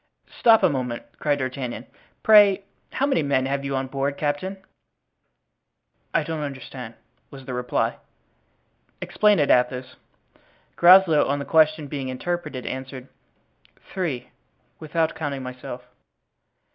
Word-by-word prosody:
"Stop 225 -2 +5
a - - +7
moment," 125 -4 -3 0.2
cried 145 -1 +1
D'Artagnan; 130 -2 -4 0.4
"pray 205 -2 +6 0.3
how 275 - +1
many 275 - +1
men 140 -3 +1
have 140 +1 -2
you 140 0 -3
on 130 0 -1
board, 140 +1 -3
captain?" 150 +7 -2 1.5
"I - - +1
don't 160 -1 -4
understand," 130 -4 -7 0.3
was 135 -1 -12
the 130 - -6
reply. 125 0 -1 1.0
"Explain 210 -1 +2
it, 145 -3 +2
Athos." 125 +1 +1 0.8
Groslow, 175 -3 +6
on 140 +1 0
the 140 - -5
question 155 -1 +3
being 140 -2 -5
interpreted, 150 0 -4
answered, 130 0 -7 0.8
"Three, 155 -10 -3 0.5
without 160 +1 -1
counting 140 -4 -4
myself." 125 -1 -8
140 Hz, 120 wpm, -23 LUFS, 130-160 Hz, 1.5 s, a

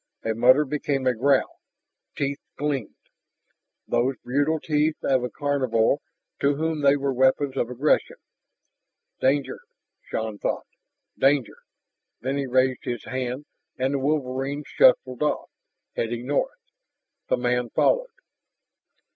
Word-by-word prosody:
A 115 - +1
mutter 130 +6 +5
became 140 -1 -2
a 130 - +3
growl, 135 +3 +1 0.6
teeth 140 0 -1 0.2
gleamed 140 -5 -2 0.9
those 120 +3 +1
cruel 145 +5 +1
teeth 150 +1 +1
of 130 -2 +2
a 125 - -2
carnivore 135 -3 +1 0.4
to 140 0 +2
whom 160 0 -1
they 140 0 +5
were 140 -1 -1
weapons 130 +2 +2
of 120 - -1
aggression. 130 +5 +1 1.0
Danger... 140 +1 +1 0.4
Shann 110 -2 -4
thought - - -2 0.5
"danger." 135 -2 +2 0.6
Then 130 +3 -2
he 140 -1 -2
raised 130 0 +2
his 120 -2 -4
hand, 130 +2 -4 0.3
and 130 +2 0
the 140 - 0
wolverine 140 0 -1
shuffled 130 0 +3
off, 150 - -1 0.4
heading 120 +1 -2
north. 325 - -1 0.7
The - - +2
man 125 0 0
followed. - - +2
135 Hz, 120 wpm, -25 LUFS, 125-145 Hz, 1.0 s, mutter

